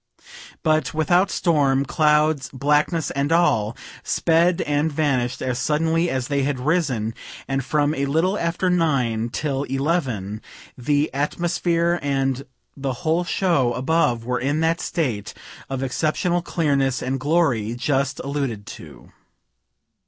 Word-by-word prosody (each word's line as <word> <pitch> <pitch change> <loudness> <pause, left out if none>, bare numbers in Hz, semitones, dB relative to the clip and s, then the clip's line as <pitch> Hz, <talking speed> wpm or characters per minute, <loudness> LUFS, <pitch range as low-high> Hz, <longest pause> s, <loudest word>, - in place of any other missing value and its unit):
But 155 0 +1
without 175 +5 +3
storm, 140 -7 +2
clouds, 150 -1 +2
blackness 150 +4 +1
and 140 +2 -1
all, 120 -11 +2 0.2
sped 170 +1 +2
and 150 +2 0
vanish'd 135 -5 0
as 125 -1 -1
suddenly 160 +4 +1
as 130 -3 -2
they 140 -1 0
had 135 -1 -1
risen; 130 -7 0 0.3
and 135 0 -1
from 145 +2 +1
a 140 -2 -1
little 165 +7 +1
after 175 0 0
9 130 -10 +1
till 135 +1 -2
11 135 - -2 0.3
the 145 +4 0
atmosphere 170 +3 0
and 135 -1 -1 0.3
the 135 -1 -3
whole 165 +3 +2
show 170 -9 +1
above 125 -3 +1
were 125 0 -1
in 145 +4 0
that 165 +1 +1
state 125 - -2 0.3
of 135 0 -3
exceptional 160 +6 0
clearness 140 -6 0
and 135 +1 -2
glory 130 -8 +1
just 135 +1 -1
alluded 135 -7 -3
to. 75 - -12
145 Hz, 130 wpm, -22 LUFS, 130-160 Hz, 0.3 s, without